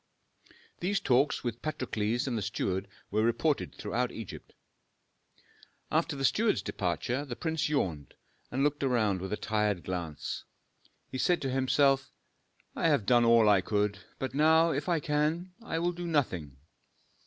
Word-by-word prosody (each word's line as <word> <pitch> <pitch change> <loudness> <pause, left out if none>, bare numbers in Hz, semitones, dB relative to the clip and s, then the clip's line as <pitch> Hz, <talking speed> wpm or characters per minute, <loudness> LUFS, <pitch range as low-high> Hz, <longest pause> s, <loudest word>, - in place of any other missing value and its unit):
These 195 +2 0
talks 135 +2 +2
with 120 -1 -3
Patrokles 120 -5 -1
and 130 -3 -2
the 110 - -1
steward 95 -1 -2 0.2
were 105 +2 +2
reported 125 +6 +1
throughout 120 +4 -2
Egypt. 115 -5 -9 1.4
After 160 -1 +1
the 135 -1 -1
steward's 220 +9 +2
departure, 120 +9 -2
the 130 -4 -6
prince 160 0 -1
yawned 85 - -2 0.3
and 135 +2 0
looking 145 -2 +1
around 105 -7 +1
with 95 - -5
a 105 - -1
tired 105 -4 0
glance, 85 -5 -4 0.7
he 130 - -4
said 175 +4 +3
to 135 - -1
himself, 135 +1 +2 0.6
"I - - +1
have 100 - +2
done 120 0 +5
all 115 -2 +6
I 100 -2 +5
could, 105 +1 0 0.2
but 130 -1 -4
now, 160 +3 +5
if 145 +3 -2
I 170 -2 +2
can, 155 +4 -1
I 230 - -3
will 175 +2 +1
do 175 0 -6
nothing." 90 - -1
130 Hz, 155 wpm, -30 LUFS, 105-150 Hz, 1.4 s, all